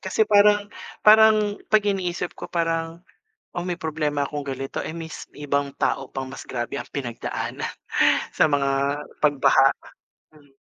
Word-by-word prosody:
Kasi 200 +3 +1
parang 205 -1 +4 0.4
parang 215 -1 +6
'pag 215 -1 +4
iniisip 180 -3 -2
ko - - -7
parang, 165 0 -2 0.5
"Oh, 175 - -2
may 180 -1 -3
problema 150 -3 -1
akong 145 -1 -5
ganito. 135 -1 -5
Eh, - - -5
mis 165 -1 -7
may 145 0 -9
ibang 140 0 0
tao 135 -1 0
pang 135 -1 -4
mas 135 - -9
grabe 120 +2 -4
ang - - -6
pinagdaanan 120 -5 -4 0.6
sa - - +3
mga 140 0 0 0.2
pagbaha." 135 -2 +5 0.6
Hmm. 145 -3 -22
155 Hz, 145 wpm, -23 LUFS, 140-185 Hz, 0.6 s, parang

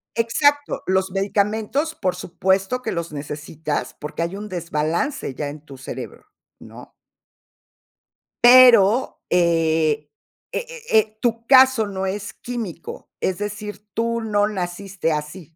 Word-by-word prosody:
Exacto, 285 +5 +1
los 190 0 +1
medicamentos, 210 - 0
por 185 -3 -1
supuesto, 190 +7 -1
que 220 - -2
los 170 -2 -4
necesitas, 150 +1 -4
porque 150 +3 -5
hay 170 +3 -2
un 210 +1 -6
desbalance 170 - -2
ya 145 +2 -4
en 145 0 -9
tu 140 -3 -11
cerebro, 135 - -8 0.3
¿no? - - -13 1.5
Pero, 240 -2 +7
eh 160 -3 +2 0.4
eh - - -3
eh 480 -1 -10 0.2
eh, 215 0 -3
tu 230 -1 -1
caso 260 -4 +6
no 190 -1 -3
es 200 +2 -4
químico, 230 -9 -7
es 185 - 0
decir, 210 0 -6
tú 230 +1 0
no 210 -2 +1
naciste 185 -2 -3
así. 155 +2 -6
195 Hz, 125 wpm, -22 LUFS, 165-230 Hz, 1.5 s, Pero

